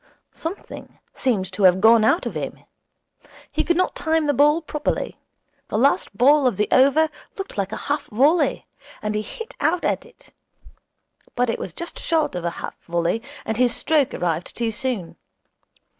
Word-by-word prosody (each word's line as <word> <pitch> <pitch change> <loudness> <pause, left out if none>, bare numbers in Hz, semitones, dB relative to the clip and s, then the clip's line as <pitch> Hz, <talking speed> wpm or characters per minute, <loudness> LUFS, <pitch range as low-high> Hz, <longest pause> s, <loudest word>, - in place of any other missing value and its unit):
Something 335 +5 -7 0.2
seemed 200 -8 -1
to 185 - -5
have 185 -1 +6
gone 225 +2 +6
out 330 +11 +3
of - - -3
him. - - -6 0.9
He - - 0
could 345 -1 +1
not 370 - +1
time 320 -1 +1
the 290 - +2
ball 295 +4 +4
properly. 300 -1 -3 0.5
The - - -2
last 240 -5 +2
ball 280 +3 +5
of 230 -7 0
the 210 - +1
over 280 +4 +5 0.3
looked 390 0 -6
like 195 -1 -2
a - - -3
half 290 +1 -1
volley, 285 +10 +2 0.4
and 210 0 -1
he 210 - 0
hit 455 - -8
out 335 +4 +1
at - - 0
it. 480 0 -20 1.0
But 245 -1 +1
it - - -4
was - - -6
just 340 0 -6
short 325 -2 +1
of 180 -1 -4
a - - +2 0.2
half - - -11
volley, 170 +5 0 0.2
and 220 -1 -2
his 245 -1 +2
stroke 300 -4 +2
arrived 170 -1 -2
too 230 -1 0
soon. 220 -6 -4
255 Hz, 175 wpm, -22 LUFS, 210-315 Hz, 1.0 s, have